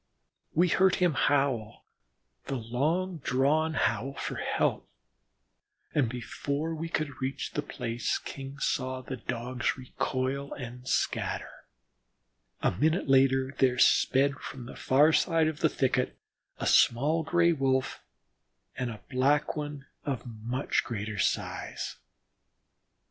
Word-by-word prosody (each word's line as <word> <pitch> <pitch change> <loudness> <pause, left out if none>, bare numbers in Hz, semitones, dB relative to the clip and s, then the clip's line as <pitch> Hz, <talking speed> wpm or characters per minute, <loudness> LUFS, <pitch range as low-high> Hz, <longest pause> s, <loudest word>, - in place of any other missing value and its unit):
We 175 +3 +5
heard 190 +1 +4
him 180 -3 +2
howl 135 -7 +1 0.6
the 135 - -3
long 150 +10 -1
drawn 150 +5 +1
howl 120 +2 0
for - - -4
help, - - 0 1.0
and 135 -6 +2
before 140 +6 -3
we 165 +1 -4
could 155 -5 -3
reach 130 +1 -3
the - - -1
place 115 +1 -2
King 135 0 -8
saw 130 -1 -1
the 130 0 -6
Dogs 125 +2 -2
recoil 130 +2 -2
and 125 -1 -8
scatter. - - -2 1.0
A - - +4
minute 155 - +1
later 135 0 +4
there 125 -2 +3
sped 135 +2 +4
from 125 -2 -8
the - - -9
far 145 +4 +4
side 165 -2 +3
of 155 -1 -3
the 160 - +3
thicket 125 -2 0 0.4
a - - -4
small 145 +7 +4
Gray 170 +1 +3
wolf 130 -3 0 0.7
and 125 - -2
a 110 -2 -8
Black 140 +4 +2
One 145 -2 -5 0.2
of 135 -5 -3
very 120 -3 -9
much 125 +5 0
greater 110 -3 -4
size. - - -2
135 Hz, 125 wpm, -29 LUFS, 125-150 Hz, 1.0 s, We